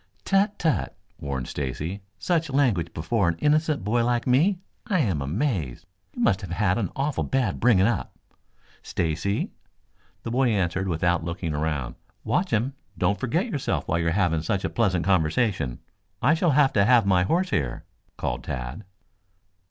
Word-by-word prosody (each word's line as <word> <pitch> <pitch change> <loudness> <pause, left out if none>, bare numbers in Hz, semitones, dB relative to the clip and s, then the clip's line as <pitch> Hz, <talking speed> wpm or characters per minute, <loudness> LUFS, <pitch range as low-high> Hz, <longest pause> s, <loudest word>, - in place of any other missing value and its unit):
"Tut, 200 +1 +2
tut!" 160 -3 0 0.2
warned 70 -3 -4
Stacy. 75 +8 -4 0.2
"Such 165 - 0
language 120 - +1
before 85 +3 0
an 85 - -2
innocent 150 - +1
boy 115 +4 +1
like 120 0 0
me? 155 +10 +3 0.3
I 200 -5 +1
am 95 - 0
amazed. 80 - -2 0.3
You 245 - -1
must 95 - +3
have 95 - -7
had 90 +4 +1
an 100 - -1
awful 140 +1 -1
bad 125 -8 0
bringing 110 -6 +4
up." 115 -2 -1 0.7
"Stacy!" 85 +5 -1 0.7
The 115 - -4
boy 130 +1 +2
answered 95 -3 0
without 85 0 +1
looking 85 -1 -3
around. 75 -4 -2 0.3
"Watch 185 +1 0
him. 120 +5 0 0.2
Don't 100 - +1
forget 145 - 0
yourself 145 - -2
while 85 - +1
you 85 - 0
are 80 - +1
having 85 -5 +2
such 95 +4 -1
a - - -2
pleasant 95 -7 +1
conversation. 90 - +1 0.4
I 130 +6 +4
shall 165 +1 +2
have 140 -2 +4
to 100 - +4
have 120 -1 +5
my 95 -2 +4
horse 175 - +1
here," 65 -6 -1 0.3
called - - -3
Tad. 65 - -5
100 Hz, 165 wpm, -25 LUFS, 85-130 Hz, 0.7 s, have